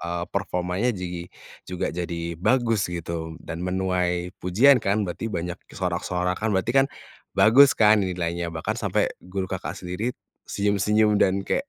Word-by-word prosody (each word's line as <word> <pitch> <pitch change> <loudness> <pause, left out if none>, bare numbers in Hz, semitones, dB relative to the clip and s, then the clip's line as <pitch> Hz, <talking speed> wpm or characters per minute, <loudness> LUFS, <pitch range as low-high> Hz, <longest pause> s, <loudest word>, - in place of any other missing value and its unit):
eee, 85 0 -3
performanya 90 +2 -1
jigi 90 -1 -5 0.4
juga 90 -1 -2
jadi 85 -1 -4
bagus 115 -4 +2
gitu 85 -1 -5
dan 85 +1 -6
menuai 90 -1 -1
pujian 120 +10 +5
kan, 100 +1 +1
berarti 95 +5 -4
banyak 90 -1 -4 0.2
sorak-sorakan, 90 +3 -1
berarti 115 +5 0
kan 135 0 +5 0.5
bagus 135 +5 +7
kan 110 -1 +5
nilainya? 85 -2 -2
Bahkan 80 -1 -3
sampe - - 0
guru 95 +1 -4
Kakak 95 0 -5
sendiri 95 +7 -4 0.3
senyum-senyum 105 +1 +2
dan 95 0 +2
kayak, 275 +1 -1
90 Hz, 140 wpm, -24 LUFS, 85-105 Hz, 0.5 s, bagus